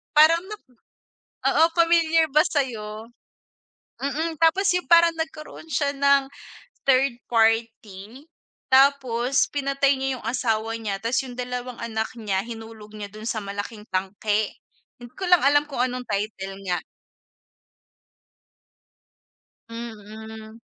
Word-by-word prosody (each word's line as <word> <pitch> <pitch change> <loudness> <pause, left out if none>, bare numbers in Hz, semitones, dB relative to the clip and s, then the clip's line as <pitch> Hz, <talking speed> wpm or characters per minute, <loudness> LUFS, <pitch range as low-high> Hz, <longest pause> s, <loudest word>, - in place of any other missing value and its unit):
Parang 315 +2 +7
nak 425 +1 -9 0.9
oo, - - +4
familiar 330 -1 +4
ba 305 +2 +5
sayo? 225 -6 -3 0.9
Mm, 310 +4 -2
tapos 330 +4 +4
yung 360 - -2
parang 340 0 +7
nagkaroon 315 0 -6
siya 280 0 +1
ng, 280 0 +3 0.6
third 260 -2 +3
party, 225 +1 0 0.5
tapos 265 -1 +3
pinatay 275 -1 +1
niya 265 -1 -1
yung - - -14
asawa 225 -2 -1
niya, 205 -3 -3
tas 230 +3 0
yung 250 - -8
dalawang 250 -1 -5
anak 220 -1 -2
niya 200 -4 -1
hinulog 225 -2 -10
niya 205 -1 -7
dun 215 +1 -10
sa 220 - -2
malaking 205 +2 -6
tangke, 205 +3 -1 0.5
hindi 240 - -10
ko 385 - -3
lang 360 -2 +6
alam 290 +1 +4
kung 255 -3 -2
anong 250 0 -3
title 200 -2 -3
niya. 180 -2 -1 2.9
Mm. 220 -1 -9
240 Hz, 120 wpm, -24 LUFS, 220-280 Hz, 2.9 s, Parang